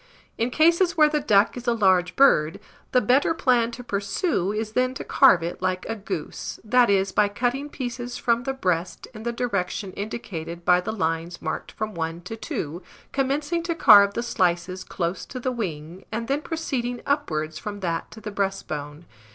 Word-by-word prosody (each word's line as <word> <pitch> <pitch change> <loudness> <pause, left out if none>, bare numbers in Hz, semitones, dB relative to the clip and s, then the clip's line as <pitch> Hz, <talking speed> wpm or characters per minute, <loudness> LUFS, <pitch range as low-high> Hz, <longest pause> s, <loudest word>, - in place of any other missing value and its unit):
In 230 +2 0
cases 335 +5 +3
where 305 -1 +6
the 300 0 +1
duck 205 -6 +3
is 245 0 -8
a 235 - +4
large 185 -4 +3
bird, 160 - +4 0.3
the 250 - +4
better 265 +8 +3
plan 240 -4 +2
to 245 - -7
pursue 200 - -1
is 215 0 -3
then 255 +2 +1
to - - -5
carve 185 -11 +5
it 170 +1 -5
like 185 0 -1
a 225 - -2
goose, 195 -7 -5
that 240 +1 +4
is, 195 -1 +2
by 210 - +3
cutting 250 +7 -1
pieces 245 -3 -5
from 235 -1 +1
the 270 +2 -2
breast 180 -8 -2
in 215 - -9
the 235 +1 -2
direction 200 -5 -2
indicated 175 -6 -6
by 180 0 +5
the 220 - -3
lines 170 -4 -2
marked 160 - -5
from 215 0 -4
1 165 0 -4
to 180 +6 -7
2, 170 -6 -5 0.3
commencing 290 +5 0
to 335 0 -2
carve 205 -8 +7
the 235 - -1
slices 185 -4 0
close 175 +1 -3
to 255 - -6
the 255 +1 -1
wing, 175 -6 -5
and 230 +1 -3
then 280 +2 0
proceeding 260 -7 -3
upwards 155 - -1
from 205 +3 -6
that 170 -3 -2
to 220 - -11
the 210 -1 -6
breastbone. 170 -6 -4
210 Hz, 185 wpm, -24 LUFS, 180-250 Hz, 0.3 s, carve